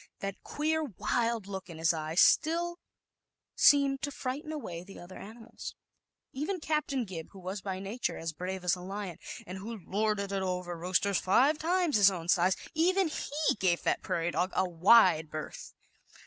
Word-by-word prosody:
That 195 Hz, -1 st, -5 dB
queer, 315 Hz, +2 st, -1 dB
wild 230 Hz, -, -1 dB
look 190 Hz, -1 st, -7 dB
in 165 Hz, -2 st, -9 dB
its 165 Hz, +1 st, +3 dB
eyes 160 Hz, +1 st, +1 dB
still 345 Hz, +2 st, +3 dB, 0.8 s
seemed 275 Hz, -1 st, +5 dB
to 285 Hz, -, -2 dB
frighten 285 Hz, +3 st, -5 dB
away 180 Hz, -, -5 dB
the 195 Hz, +1 st, -12 dB
other 175 Hz, +2 st, -11 dB
animals. 225 Hz, +2 st, -9 dB, 0.6 s
Even 315 Hz, +8 st, -2 dB
Captain 300 Hz, -5 st, -1 dB
Gib, 170 Hz, -5 st, -7 dB
who 195 Hz, -, -11 dB
was, 190 Hz, +2 st, -5 dB
by 190 Hz, -1 st, -4 dB
nature, 200 Hz, +6 st, -3 dB
as 165 Hz, 0 st, -4 dB
brave 185 Hz, +3 st, -5 dB
as 180 Hz, -1 st, +2 dB
a 180 Hz, -, -10 dB
lion, 190 Hz, -1 st, -6 dB, 0.3 s
and 185 Hz, +2 st, -7 dB
who 225 Hz, +4 st, -6 dB
lorded 205 Hz, -1 st, -1 dB
it 195 Hz, -1 st, -1 dB
over 180 Hz, -2 st, -3 dB
roosters 180 Hz, +3 st, +1 dB
five 275 Hz, +11 st, +3 dB
times 345 Hz, -4 st, +2 dB
his 200 Hz, -1 st, +7 dB
own 175 Hz, -3 st, -6 dB
size 180 Hz, +1 st, +3 dB, 0.2 s
even 360 Hz, +3 st, +2 dB
he 305 Hz, 0 st, -1 dB
gave 175 Hz, -2 st, +1 dB
that -, -, +1 dB
prairie 170 Hz, +1 st, -1 dB
dog 180 Hz, +2 st, 0 dB
a 190 Hz, -, +2 dB
wide 175 Hz, -2 st, +5 dB
berth. 155 Hz, 0 st, -7 dB
195 Hz, 175 wpm, -30 LUFS, 180-280 Hz, 0.8 s, his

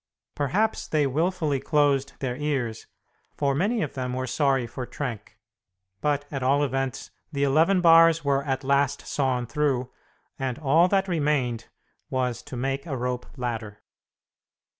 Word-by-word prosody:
Perhaps 195 Hz, +10 st, 0 dB
they 150 Hz, -2 st, +2 dB
wilfully 155 Hz, 0 st, 0 dB
closed 140 Hz, -1 st, +1 dB
their 125 Hz, -2 st, -2 dB
ears, 135 Hz, -6 st, -2 dB, 0.5 s
for 140 Hz, -1 st, +1 dB
many 205 Hz, -, +1 dB
of -, -, -4 dB
them 125 Hz, -2 st, -3 dB
were 130 Hz, 0 st, -2 dB
sorry 135 Hz, -1 st, +1 dB
for 120 Hz, +2 st, -6 dB
Trenck; 115 Hz, -7 st, -6 dB, 0.6 s
but, 145 Hz, -1 st, 0 dB
at 135 Hz, -2 st, -3 dB
all 140 Hz, +3 st, +3 dB
events, 135 Hz, -2 st, -2 dB, 0.2 s
the 140 Hz, -2 st, -1 dB
eleven 160 Hz, +7 st, +3 dB
bars 165 Hz, -2 st, +6 dB
were 140 Hz, 0 st, +2 dB
at 135 Hz, -1 st, -2 dB
last 140 Hz, +1 st, +1 dB
sawn 130 Hz, -3 st, 0 dB
through, 130 Hz, 0 st, -1 dB, 0.5 s
and 130 Hz, -2 st, -2 dB
all 155 Hz, +4 st, +4 dB
that 195 Hz, 0 st, +1 dB
remained 145 Hz, -9 st, 0 dB, 0.4 s
was 125 Hz, -3 st, -1 dB
to 125 Hz, -, -8 dB
make 135 Hz, +4 st, -2 dB
a 135 Hz, -4 st, -3 dB
rope 125 Hz, 0 st, -3 dB
ladder. 115 Hz, -4 st, -5 dB
140 Hz, 145 wpm, -25 LUFS, 130-150 Hz, 0.6 s, bars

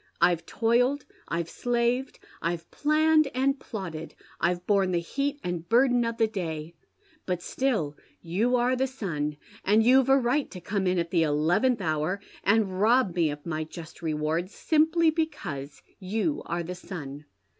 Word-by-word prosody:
I've 170 Hz, -1 st, +2 dB
toiled, 245 Hz, +5 st, +2 dB, 0.2 s
I've 170 Hz, -1 st, -2 dB
slaved, 245 Hz, +5 st, -1 dB, 0.2 s
I've 170 Hz, 0 st, -3 dB
planned 310 Hz, 0 st, +3 dB
and 270 Hz, +2 st, +1 dB
plotted, 170 Hz, -7 st, -6 dB, 0.2 s
I've 175 Hz, +1 st, 0 dB
borne 195 Hz, -2 st, +3 dB
the -, -, +2 dB
heat 280 Hz, -, -2 dB
and 175 Hz, -1 st, -4 dB
burden 245 Hz, 0 st, +4 dB
of 230 Hz, 0 st, -3 dB
the 225 Hz, -, +4 dB
day; 165 Hz, -7 st, -4 dB, 0.5 s
but 180 Hz, -2 st, -2 dB
still 215 Hz, -, -1 dB, 0.2 s
you 210 Hz, +9 st, +1 dB
are 250 Hz, +1 st, +2 dB
the 265 Hz, +1 st, +1 dB
son, 155 Hz, -, -3 dB, 0.3 s
and 215 Hz, +3 st, +4 dB
you've 260 Hz, +2 st, +5 dB
a 270 Hz, -, +7 dB
right 265 Hz, +3 st, +1 dB
to 185 Hz, -, -8 dB
come 190 Hz, +2 st, -2 dB
in 180 Hz, 0 st, +2 dB
at 170 Hz, -1 st, -1 dB
the 170 Hz, -, +3 dB
eleventh 165 Hz, -, +2 dB
hou. 155 Hz, +2 st, 0 dB, 0.3 s
and 200 Hz, -2 st, +2 dB
rob 230 Hz, -3 st, +4 dB
me 165 Hz, -3 st, +2 dB
of 145 Hz, 0 st, -7 dB
my 155 Hz, -2 st, -2 dB
just 160 Hz, +1 st, -10 dB
reward, 160 Hz, +2 st, -1 dB
simply 320 Hz, +6 st, +3 dB
because 175 Hz, -, -4 dB, 0.2 s
you 220 Hz, -, -1 dB
are 170 Hz, 0 st, -2 dB
the 175 Hz, +2 st, -5 dB
son.' 150 Hz, -6 st, -8 dB
195 Hz, 160 wpm, -27 LUFS, 165-250 Hz, 0.5 s, a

